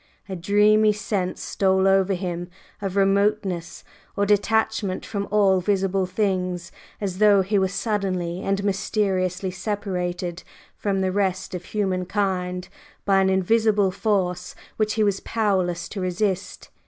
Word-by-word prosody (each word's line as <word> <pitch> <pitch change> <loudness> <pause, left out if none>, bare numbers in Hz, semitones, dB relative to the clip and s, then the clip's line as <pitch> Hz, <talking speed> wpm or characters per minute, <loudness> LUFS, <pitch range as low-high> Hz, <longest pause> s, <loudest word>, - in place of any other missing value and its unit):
A 190 - -5
dreamy 210 +4 +4
sense 195 -3 -3
stole 190 -1 +2
over 195 0 +3
him 175 -1 -4 0.3
of 195 -2 -3
remoteness 195 -3 +1 0.3
or 200 - +2
detachment 205 -1 +1
from 200 -2 -3
all 195 -3 +3
visible 195 -1 0
things, 185 -3 -1 0.3
as 190 -2 -3
though 205 -2 +5
he 200 +2 +1
were 190 - +2
suddenly 190 -3 -2
and 195 0 -1
mysteriously 190 -2 0
separated 180 -2 -3 0.3
from 195 -2 -1
the 190 0 +1
rest 190 -1 -1
of 180 0 -5
humankind 185 -2 -1 0.4
by 195 -1 +4
an 190 - +3
invisible 205 +1 +2
force 185 -3 -1 0.2
which 215 -1 0
he 220 - +2
was 200 -2 +1
powerless 185 -6 -1
to 200 - -5
resist. 185 +1 -2
195 Hz, 130 wpm, -23 LUFS, 185-205 Hz, 0.4 s, though